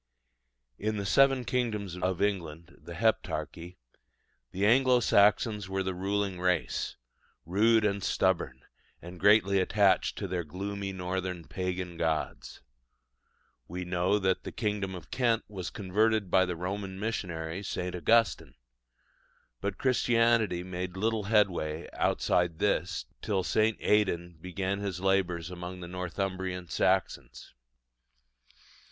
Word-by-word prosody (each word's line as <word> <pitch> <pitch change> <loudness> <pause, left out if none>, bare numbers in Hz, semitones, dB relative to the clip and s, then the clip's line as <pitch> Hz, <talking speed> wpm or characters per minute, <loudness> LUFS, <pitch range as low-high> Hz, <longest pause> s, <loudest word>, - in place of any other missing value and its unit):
In 110 +1 -1
the 100 - -3
seven 135 +3 +4
kingdoms 105 -8 -1
of 90 +1 -1
England 85 -4 -3
the 85 - -9
Heptarchy 90 -4 -1 0.7
the 95 +2 -1
Anglo 125 +2 +5
Saxons 105 -2 +3
were 95 0 -1
the 95 0 -2
ruling 100 0 -2
race, 90 -2 0 0.5
rude 110 +5 +3
and 100 -1 0
stubborn, 80 -12 0 0.4
and 90 +1 -10
greatly 100 0 +5
attached 100 +1 +2
to 100 - -3
their 90 -1 -2
gloomy 100 +5 -5
northern 90 -1 -3
pagan 90 -2 -4
gods. 80 -1 -2 1.1
We 90 +1 -5
know 90 +3 +1
that 95 -2 0
the - - -6
kingdom 105 -3 -2
of 85 -5 -11
Kent 120 -3 +1
was 95 -4 -5
converted 105 0 0
by 95 - +5
the 90 - -2
Roman 95 +2 -4
missionary 90 -5 -3
St. 90 -2 -4
Augustine; 115 +6 +2 1.0
but 100 -1 -3
Christianity 115 -7 +2
made 90 0 -5
little 110 +1 0
headway 90 -7 +1
outside 85 -2 +1
this 90 -4 0 0.2
till 95 -3 0
St. 110 +3 +2
Aidan 85 -5 +1
began 95 +2 -3
his 100 -3 -3
labours 90 -3 0
among 90 +1 -7
the 85 - -7
Northumbrian 90 0 -4
Saxons. - - -1
95 Hz, 120 wpm, -29 LUFS, 90-105 Hz, 1.1 s, Anglo